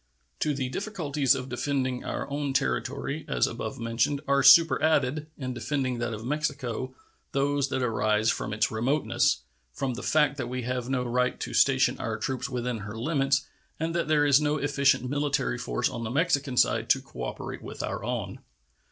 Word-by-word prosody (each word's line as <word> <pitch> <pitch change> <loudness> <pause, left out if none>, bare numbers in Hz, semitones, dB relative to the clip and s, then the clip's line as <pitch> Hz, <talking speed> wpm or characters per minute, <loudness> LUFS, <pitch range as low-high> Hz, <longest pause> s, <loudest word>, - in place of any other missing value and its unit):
To 150 -2 0
the 130 -2 -2
difficulties 150 - 0
of 125 - -5
defending 130 0 -1
our - - -4
own 140 -1 -2
territory, 65 - -1
as 60 -1 +2
above - - -5
mentioned, 115 +5 0
are 140 0 +3
superadded, 155 -1 +5
in 130 -3 -4
defending 130 -1 -2
that 120 0 -2
of 110 0 -6
Mexico, 130 -3 -2 0.4
those 140 0 +1
that 130 - -1
arise 110 -1 +2
from - - -4
its 110 +1 +1
remoteness, 130 +7 +1 0.3
from 130 - -2
the - - -6
fact 150 -2 +2
that 125 -3 -3
we 125 0 -3
have 125 0 -3
no 130 -2 0
right 125 +1 0
to - - -4
station 130 -1 +3
our 110 -2 -2
troops 130 +3 -3
within 125 -2 -2
her 105 +2 -7
limits 135 +1 +1 0.3
and 165 +1 -1
that 170 -2 0
there 150 -1 +3
is 140 0 +5
no 150 0 +1
efficient 140 -3 +2
military 140 - 0
force - - -1
on 115 - -5
the 110 - -3
Mexican 140 -2 +1
side - - +3
to - - +5
cooperate 60 -1 -6
with - - -7
our - - -4
own. - - -3
130 Hz, 180 wpm, -27 LUFS, 120-145 Hz, 0.4 s, superadded